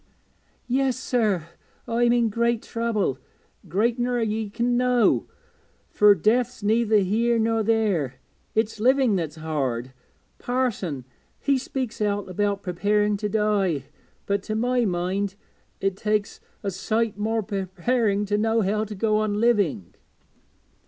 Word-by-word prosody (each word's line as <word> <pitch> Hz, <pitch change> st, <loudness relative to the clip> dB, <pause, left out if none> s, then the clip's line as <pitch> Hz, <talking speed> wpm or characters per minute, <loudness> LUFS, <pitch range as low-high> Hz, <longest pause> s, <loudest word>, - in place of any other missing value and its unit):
'Yes, 260 Hz, 0 st, +1 dB
sir, 215 Hz, -10 st, 0 dB, 0.4 s
I'm 235 Hz, +1 st, +2 dB
in 240 Hz, -2 st, +3 dB
great 235 Hz, +1 st, 0 dB
trouble, 225 Hz, -, -1 dB, 0.5 s
greater 230 Hz, -, +1 dB
ner 245 Hz, 0 st, 0 dB
ye 220 Hz, -1 st, -1 dB
can 240 Hz, +3 st, 0 dB
know, 250 Hz, -1 st, +3 dB, 0.6 s
fur 210 Hz, -1 st, +6 dB
death's 230 Hz, +5 st, +1 dB
neither 220 Hz, +1 st, +3 dB
here 225 Hz, +5 st, +2 dB
nor 225 Hz, 0 st, +1 dB
there 205 Hz, -, +1 dB, 0.4 s
it's 220 Hz, -1 st, 0 dB
living 255 Hz, -1 st, +3 dB
that's 160 Hz, -4 st, -2 dB
hard. 135 Hz, -6 st, -3 dB, 0.5 s
Parson, 210 Hz, -, -2 dB, 0.3 s
he 280 Hz, -, +2 dB
speaks 260 Hz, -3 st, -4 dB
out 205 Hz, -1 st, 0 dB
about 200 Hz, +2 st, -1 dB
preparing 205 Hz, +3 st, +1 dB
to 210 Hz, +1 st, -2 dB
die, 205 Hz, -, +1 dB, 0.4 s
but 200 Hz, 0 st, 0 dB
to 215 Hz, +2 st, -4 dB
my 245 Hz, +2 st, +1 dB
mind 190 Hz, +2 st, -1 dB, 0.4 s
it 195 Hz, -1 st, -1 dB
takes 210 Hz, 0 st, -1 dB, 0.2 s
a 200 Hz, -, -1 dB
sight 215 Hz, +3 st, -1 dB
more 220 Hz, +1 st, 0 dB
preparing 200 Hz, +2 st, 0 dB
to 205 Hz, +1 st, 0 dB
know 225 Hz, +1 st, +2 dB
how 210 Hz, +2 st, 0 dB
to 210 Hz, -1 st, -6 dB
go 215 Hz, +2 st, +1 dB
on 210 Hz, -1 st, 0 dB
living.' 205 Hz, -, +1 dB
215 Hz, 130 wpm, -24 LUFS, 195-235 Hz, 0.6 s, fur